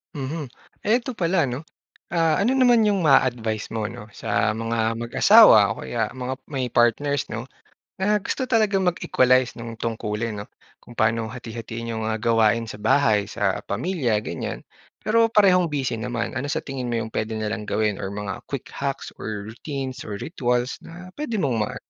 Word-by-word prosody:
Mhm. 145 +1 -4 0.3
Eh, 220 +3 +3
eto 255 +1 -5
pala 175 -5 +1
'no, 125 +1 -4 0.5
ah, 165 -1 +2
ano 250 +6 +2
naman 245 -3 +5
yung 200 -5 +2
ma-a-advice 120 -6 +2
mo 110 -1 -2
'no, 115 0 -8
sa 105 - 0
mga 115 0 -1
mag-asawa, 120 - +7
o - - -7
kaya 110 -3 -1
mga 130 0 -3 0.2
may 135 -3 -2
partners 140 +4 +2
'no, 120 +2 -5 0.5
na 205 +2 +2
gusto 260 - -2
talagang 210 -6 +2
mag-equalize 130 -7 +3
nung 115 0 -6
tungkulin 110 -1 -3
'no, 100 - -6 0.3
kung 120 - -15
paano 110 0 +1
hati-hatiin 115 -1 -6
yung, 110 -1 -3
ah, 110 - 0
gawain 115 0 +2
sa 105 - -10
bahay, 110 -3 +3
sa 100 -2 -1
pamilya, 120 - 0
ganyan. 85 - -5 0.4
Pero 230 +1 +4
parehong 190 -5 +4
busy 135 -7 -2
naman. 120 0 -3
Ano 140 - -3
sa 145 - -2
tingin 130 -3 -4
mo 120 - -1
yung 110 -1 -3
puwede 110 +1 -2
nilang 110 0 -3
gawin 105 -2 0
or - - -3
mga 100 0 -5
quick 140 -3 -6
hacks 140 -1 -4
or 105 0 -5
routines 135 +2 -6
or 105 - -4
rituals 125 -4 -1
na 180 +2 -11
pwede 295 -7 -2
mong 140 - 0
ma 105 - -2
120 Hz, 175 wpm, -23 LUFS, 110-160 Hz, 0.5 s, mag-asawa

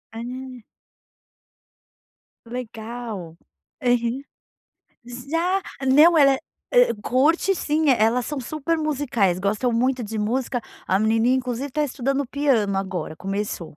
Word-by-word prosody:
Ah. 250 +1 -7 1.8
Legal, 225 -7 -7 0.4
aham. 245 +1 +1 0.8
S 245 +2 -9
Já. 360 +4 +1 0.3
Não, 310 +6 +7
ela 275 -3 +6
é - - -3 0.5
eh, - - +2
curte 320 +9 +2
sim. 310 -2 0
Elas 235 0 +3
são 295 -2 -3
super 310 +5 -2
musicais, 255 - 0
gostam 210 +6 0
muito 250 +2 +1
de 220 +1 -5
música, 245 +3 -1 0.3
a 190 - +2
menininha, 225 +4 +3
inclusive, 255 +2 -3
está 300 +3 -1
estudando 275 0 -1
piano 240 -9 +1
agora. 185 -4 -3
Começou. 195 -4 -4
245 Hz, 120 wpm, -23 LUFS, 220-280 Hz, 1.8 s, Não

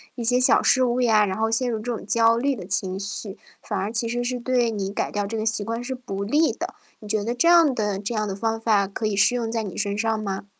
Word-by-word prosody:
一 240 - -5
些 245 +2 +2
小 255 - +4
失 260 - +4
误 245 +1 0
呀， 220 -3 +4
然 190 0 -3
后 225 0 0
陷 245 +2 +1
入 230 - -1
这 230 +3 -4
种 - - -7
焦 230 0 +3
虑 275 +3 0
的 195 - -8
情 190 -1 -2
绪， 200 0 -6 0.2
反 210 - -4
而 195 +3 -2
其 230 0 -1
实 240 +1 -2
是 250 0 -2
对 245 -1 +1
你 200 -2 -3
改 - - -2
掉 205 -1 -2
这 225 +2 -4
个 215 - -2
习 225 -1 0
惯 230 +3 -4
是 260 +2 -4
不 200 -6 -5
利 295 +10 +2
的。 - - -5 0.3
你 215 - -11
觉 215 -1 +1
得 235 +3 -2
这 335 +7 +3
样 335 -6 +6
的 210 -3 -1
这 210 +3 -4
样 215 - 0
的 200 - -3
方 225 +3 -1
法 210 -4 +2
可 205 +3 -5
以 215 - -2
适 200 +5 +3
用 230 -2 -2
在 225 -1 -1
你 195 -4 -7
身 200 0 -2
上 225 +1 0
吗？ 195 -1 -4
225 Hz, 305 characters per minute, -23 LUFS, 205-240 Hz, 0.3 s, 样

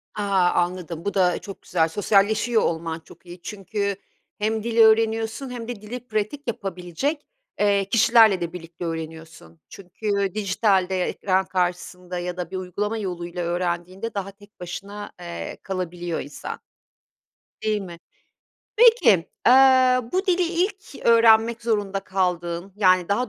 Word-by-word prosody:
A! 195 -4 +2
Anladım. 175 -1 -2
Bu 200 - -1
da 180 -3 +2
çok 195 - -10
güzel. 160 - +1
Sosyalleşiyor 210 +4 +2
olman 165 0 -2
çok 170 +2 -18
iyi 175 0 -11
çünkü 200 0 -3 0.4
hem 220 +1 -1
dil 235 0 -3
öğreniyorsun 225 +3 +3
hem 240 -2 -6
de 235 -4 -6
dili 245 +3 -8
pratik 215 +6 -3
yapabilecek, 195 - -3 0.3
eee, 200 -1 +3
kişilerle 225 -3 +5
de 170 0 -3
birlikte 170 0 -8
öğreniyorsun. 160 - -7
Çünkü 200 +1 -3
dijitalde 190 -3 +1
ekran 190 0 0
karşısında 180 0 -3
ya 180 0 -4
da 180 0 -5
bir 190 - -3
uygulama 205 +4 -3
yoluyla 175 -3 -4
öğrendiğinde 175 +4 -3
daha 200 -1 -4
tek 205 0 -21
başına, 195 +4 -7
eee, 175 -1 -6
kalabiliyor 175 -3 -4
insan. 145 - -7 1.0
Değil 215 -1 0
mi? 170 -3 -9 0.8
Peki, 455 - +5 0.2
eee, 255 0 +6
bu 380 +3 0
dili 365 0 +3
ilk 360 +1 -2
öğrenmek 230 0 +5
zorunda 205 -4 -1
kaldığın, 180 -1 -2
yani, 185 -3 +3
daha 240 +5 0
195 Hz, 135 wpm, -23 LUFS, 175-225 Hz, 1.0 s, eee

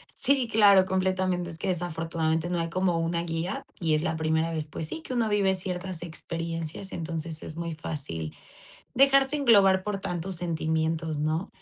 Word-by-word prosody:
Sí, 270 -3 +2
claro, 200 -3 +7
completamente, 185 -1 0
es 165 - -9
que 190 - -2
desafortunadamente 165 -1 -1
no 175 -1 0
hay 165 - -1
como 180 -1 +1
una 170 +1 0
guía 165 +3 -3 0.2
y 160 -3 +2
es 155 - 0
la 165 -2 -1
primera 160 +1 +1
vez, 155 -1 -3
pues 155 +1 -5
sí, - - -4
que 260 - -6
uno 230 -3 +1
vive 195 -2 +2
ciertas 180 -1 -4
experiencias, 165 +2 -5
entonces 165 -1 -4
es 155 - -7
muy 170 -1 -4
fácil 135 - -5 0.6
dejarse 275 +2 +5
englobar 200 -8 +5
por 205 0 -2
tantos 180 -1 -3
sentimientos, 160 -1 -1
¿no? 155 +6 -1
170 Hz, 170 wpm, -27 LUFS, 160-190 Hz, 0.6 s, claro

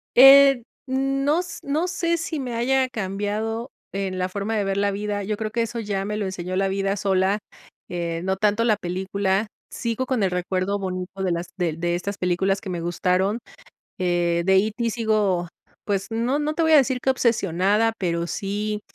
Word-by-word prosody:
Eh, 270 -1 +8 0.2
no 275 +4 +1
s 355 -1 -5
no 305 +5 0
sé, 340 -2 0
si 325 -2 -3
me 245 -3 -4
haya 260 +2 +2
cambiado, 215 +3 -3 0.2
en 195 -1 -2
la 185 0 0
forma 205 +3 -3
de 205 - +1
ver 195 0 -1
la 200 0 +2
vida. 205 0 -3
Yo 210 +1 -2
creo 215 -1 -3
que 235 - 0
eso 230 +1 -3
ya 200 -3 -2
me 210 +1 -3
lo 210 - -1
enseñó 185 -1 -4
la 195 0 +2
vida 195 +1 0
sola, 195 +1 +1 0.5
eh, 170 -1 -3
no 190 0 0
tanto 210 +2 +2
la 220 -2 +3
película. 190 +2 -1 0.2
Sigo 235 +1 -2
con 250 -5 0
el 185 - +1
recuerdo 185 +2 -1
bonito 185 0 -4
de 185 - +1
las 170 +1 -2
de 170 -4 0
de 175 +2 -1
estas 200 +3 -4
películas 190 +2 0
que 195 - -7
me 175 -2 -3
gustaron. 185 +5 0 0.6
Eh, 175 -1 +1
de 190 0 +4
E.T 220 +4 +1
sigo, 210 -6 +1 0.4
pues, 195 -2 -1
no 235 +5 0
no 300 +1 -1
te 330 - 0
voy 320 - +3
a 310 - +9
decir 260 -2 +3
qué 265 - +2
obsesionada, 210 -2 +2
pero 170 -2 -1
sí, 210 +3 -3
205 Hz, 195 wpm, -23 LUFS, 185-235 Hz, 0.6 s, a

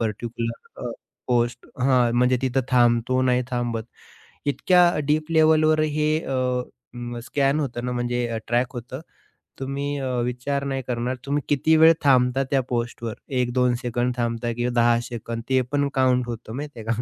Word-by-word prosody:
Particular 115 +1 -4
अ, - - -3 0.4
post 120 0 0 0.2
हां 125 -3 +3
म्हणजे 125 +1 +3
तिथं 130 0 +1
थांबतो, 120 0 +3
नाही 125 -1 +2
थांबत. 120 -2 -2 0.6
इतक्या 180 +5 +4 0.2
डीप 155 +2 0
लेव्हलवर 155 -1 +4
हे 155 0 +1
अ, 125 -1 0 0.6
स्कॅन 140 +2 +1
होतं 120 -3 -3
ना 125 - -2
म्हणजे 120 -1 -1
ट्रॅक 120 +3 0
होतं 125 +3 -7 0.6
तुम्ही 140 +2 -3
अ, 135 - -3 0.2
विचार 125 +3 -2
नाही 135 -1 -2
करणार 125 +1 -2
तुम्ही 145 +1 0
किती 150 +3 +3
वेळ 160 +1 +8
थांबता 130 -1 +4
त्या 135 -2 +3
पोस्टवर 120 -2 -3 0.3
1-2 125 0 +2
सेकंड 120 0 -1
थांबता 120 0 -1
किंवा 120 +1 -1
10 120 0 +4
सेकंद 115 -1 -5
ते 130 -1 +3
पण 145 -1 +1
काउंट 130 -1 +2
होतं 115 -1 -6
माहिती 145 -2 -6
आहे 110 - -8
का, 115 +1 -1
125 Hz, 155 wpm, -24 LUFS, 120-140 Hz, 0.6 s, वेळ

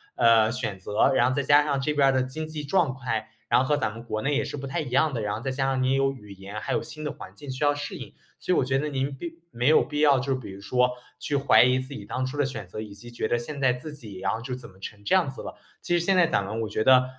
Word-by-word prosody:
呃， 115 -1 +5
选 115 -5 -3
择， 105 +7 +2
然 125 -1 +4
后 - - 0
再 140 - +1
加 145 +2 +5
上 140 -2 0
这 150 +3 0
边 140 -2 +4
儿 - - +4
的 130 - +2
经 130 +5 -4
济 155 -1 -6
状态， 130 - 0 0.2
然 - - +4
后 - - 0
和 150 - +2
咱 110 -6 -1
们 115 - -9
国 110 -2 -3
内 140 +4 0
也 145 - +1
是 - - -5
不 135 0 -5
太 155 +5 -2
一 145 - -5
样 145 +4 +2
的， 115 - -2
然 105 -1 -1
后 - - -3
再 135 +3 -3
加 135 0 0
上 130 -1 0
您 130 +1 +2
有 135 0 +2
语 105 -7 -11
言， 100 +2 -8
还 - - -3
有 - - 0
新 155 - -8
的 150 - -1
环 - - -11
境 145 -2 -10
需 130 +3 -3
要 145 0 +4
适 145 - -5
应。 - - -9 0.3
所 180 - +1
以 - - +2
我 - - +3
觉 130 +1 +1
得 150 +2 -1
您 135 -1 -2
并 170 +3 -6 0.2
没 120 +3 -1
有 155 - +6
必 150 -1 -4
要 145 -3 +5
就 135 +2 -2
是 130 - -2
比 115 - -9
如 95 +1 -10
说 125 +5 +2 0.3
去 145 - -2
怀 140 0 +5
疑 125 +1 +4
自 130 +2 -4
己 100 - -8
当 130 +4 -2
初 130 +3 -5
的 145 - +2
选 115 -8 -6
择， 110 - -7
以 105 -2 -8
及 120 +4 -12
觉 120 - -2
得 120 - +2
现 140 +5 -6
在 130 -2 +3
自 145 +5 -7
己 110 -9 -8
然 95 +1 0
后 110 - -3
就 125 +1 -4
怎 130 - -10
么 95 0 -20
成 100 +1 -9
这 - - +1
样 180 -7 +3
子 135 - -7
了。 - - -7 0.3
其 175 - +1
实 170 - 0
现 195 - +3
在 175 - +5
咱 100 -11 +1
们 110 +3 -3
我 110 - -3
觉 110 +1 -1
得 130 0 +6
130 Hz, 355 characters per minute, -26 LUFS, 115-145 Hz, 0.3 s, 有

